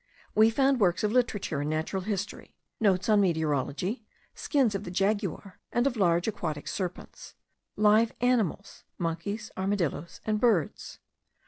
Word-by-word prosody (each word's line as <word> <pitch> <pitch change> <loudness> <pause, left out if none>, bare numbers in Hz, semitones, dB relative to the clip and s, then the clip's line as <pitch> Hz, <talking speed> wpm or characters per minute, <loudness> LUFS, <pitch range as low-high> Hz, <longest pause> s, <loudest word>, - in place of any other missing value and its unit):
We 220 +1 +6
found 270 +3 +2
works 180 -3 +2
of 210 - +1
literature 225 - 0
and 145 - -2
natural 160 +5 -2
history; 200 +1 -5 0.2
notes 195 -3 +2
on 210 -2 +5
meteorology; 160 - -1 0.3
skins 265 -8 +1
of 195 0 -3
the 180 - -6
jaguar 195 0 -1
and 240 +1 +1
of 275 -3 +1
large 175 -4 +2
aquatic 155 -8 -3
serpents; 180 -3 -6 0.4
live 215 +2 +4
animals, 230 -6 0
monkeys, 200 +6 -3
armadilloes, 190 -5 -2
and 215 -1 0
birds. 210 -11 +1
200 Hz, 135 wpm, -28 LUFS, 175-220 Hz, 0.4 s, We